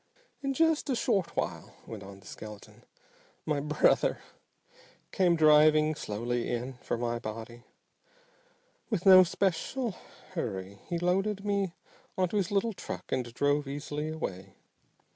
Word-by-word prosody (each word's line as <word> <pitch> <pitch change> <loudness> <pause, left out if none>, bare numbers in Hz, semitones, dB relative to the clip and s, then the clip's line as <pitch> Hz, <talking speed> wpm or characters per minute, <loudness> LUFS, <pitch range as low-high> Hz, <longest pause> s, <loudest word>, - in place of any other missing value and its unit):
"In 275 -1 -1
just 320 -1 +2
a 260 - +2
short 195 -6 0
while," - - -3
went 110 -3 -8
on 100 0 -11
the - - -20
skeleton, 105 -1 -11 0.6
"my 150 -2 0
'brother' 150 +1 +2 0.9
came 180 -3 +3
driving 155 0 +6
slowly 120 -2 -3
in 120 +2 -3
for - - -2
my 120 0 -2
body. 115 +1 -7 1.2
With 205 -6 -1
no 185 -1 +10
special 200 +7 -1 0.4
hurry 100 - -4
he 175 - -1
loaded 195 +4 0
me 200 -3 0 0.4
onto 185 +2 +1
his 190 -3 0
little 205 +3 +1
truck - - -7
and 125 -2 -1
drove 145 +3 +1
easily 145 +2 -4
away. 95 - -5
155 Hz, 130 wpm, -30 LUFS, 120-190 Hz, 1.2 s, no